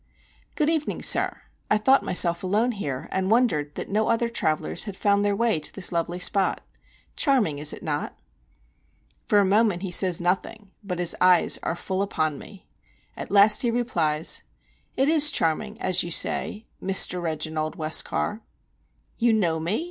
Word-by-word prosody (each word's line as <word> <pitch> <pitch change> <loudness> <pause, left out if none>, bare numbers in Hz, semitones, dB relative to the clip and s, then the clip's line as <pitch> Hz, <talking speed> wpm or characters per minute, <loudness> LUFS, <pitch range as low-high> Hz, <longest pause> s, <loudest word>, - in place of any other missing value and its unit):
"Good 300 - 0
evening, 315 -2 -2
sir. - - +3 0.3
I 210 - +3
thought 265 +6 +3
myself 175 -1 +2
alone 210 +6 0
here, 145 - -5
and 190 0 -2
wondered 170 -12 +1
that - - -6
no 215 +2 -1
other 230 0 0
travellers 155 -8 -2
had 200 -3 -8
found 200 0 +1
their 205 -1 0
way 230 -5 0
to 150 - -5
this 195 - 0
lovely 170 +1 -2
spot. 190 +1 +1 0.5
Charming, 220 - +1
is 150 0 0
it - - -10
not?" 150 -2 -4 1.1
For 210 - +2
a 200 - +4
moment 200 -2 +1
he 190 - -4
says 180 -1 +3
nothing, 190 +3 -3
but 180 -3 -5
his 175 -1 +1
eyes 180 -1 +4
are - - -3
full 190 +2 -4
upon 155 -7 -2
me. 195 - -14 0.5
At - - -8
last 205 +1 +5
he 240 - 0
replies: 170 -10 0 0.6
"It 270 - +2
is 305 -1 +6
charming, 210 - -2
as 185 -1 +1
you 175 - -4
say, 210 +5 0 0.2
Mr. 185 -1 +2
Reginald 155 -1 -4
Westcar." 160 +7 +1 0.8
"You 235 -1 +2
know 170 -7 0
me?" 170 +7 -2
190 Hz, 165 wpm, -24 LUFS, 165-220 Hz, 1.1 s, is